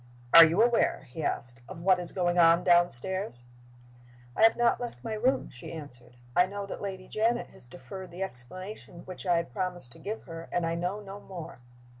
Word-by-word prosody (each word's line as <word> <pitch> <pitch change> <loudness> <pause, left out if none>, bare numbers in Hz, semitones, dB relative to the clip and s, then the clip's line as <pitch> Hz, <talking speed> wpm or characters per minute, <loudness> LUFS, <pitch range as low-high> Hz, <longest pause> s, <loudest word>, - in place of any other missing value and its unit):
"Are 165 - +12
you 165 +7 +4
aware," 240 0 +2
he 160 - -6
asked, 125 -3 -3
"of 165 - -8
what 185 -1 +4
is 175 - -4
going 175 -1 +1
on 170 +1 +6
downstairs?" 175 - +2 0.9
"I - - -2
have 225 0 +6
not 240 0 +3
left 240 -1 -6
my 225 -2 -3
room," 245 +5 0
she 125 - -9
answered. 135 -6 -10 0.2
"I 180 +1 +5
know 200 +1 -5
that 195 - -7
Lady 190 -2 -6
Janet 230 +2 0
has - - -17
deferred 180 +10 -9
the 175 +3 -5
explanation 185 - -8
which 185 +1 -8
I 175 -1 +4
had 170 0 -3
promised 180 - -3
to - - -12
give 215 +2 -5
her, 165 -1 -9
and 175 -1 0
I 165 - -1
know 180 +5 -2
no 200 0 -9
more." 170 -8 -9
180 Hz, 200 wpm, -29 LUFS, 165-200 Hz, 0.9 s, Are